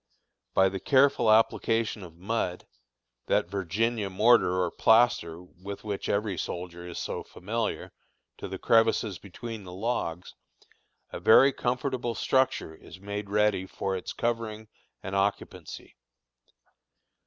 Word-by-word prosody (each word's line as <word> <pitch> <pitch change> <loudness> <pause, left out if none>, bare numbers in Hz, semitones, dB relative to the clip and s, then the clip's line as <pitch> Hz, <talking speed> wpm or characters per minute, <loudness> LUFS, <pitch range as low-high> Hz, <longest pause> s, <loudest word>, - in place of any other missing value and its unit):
By 95 - +5
the 95 0 -3
careful 135 0 +3
application 115 0 +2
of 85 -3 -11
mud 95 -2 -2 0.6
that 85 - +1
Virginia 100 +3 -1
mortar 95 -2 +4
or 85 - -2
plaster 110 -8 +3
with 95 +2 -10
which 105 -2 -4
every 100 -4 -1
soldier 85 0 -6
is 90 - -7
so - - -4
familiar 110 +4 -4 0.5
to - - -5
the - - -6
crevices 115 -4 +2
between 110 +2 -8
the 90 - -10
logs, 95 -5 -3 0.8
a - - -6
very 135 +5 +6
comfortable 125 -1 -2
structure 130 -11 +1
is 85 - -14
made 100 +1 -5
ready 105 -2 +1
for 95 0 -3
its 90 - -5
covering 110 -2 -3 0.3
and 95 0 -4
occupancy. 100 +1 -3
105 Hz, 125 wpm, -28 LUFS, 95-115 Hz, 0.8 s, very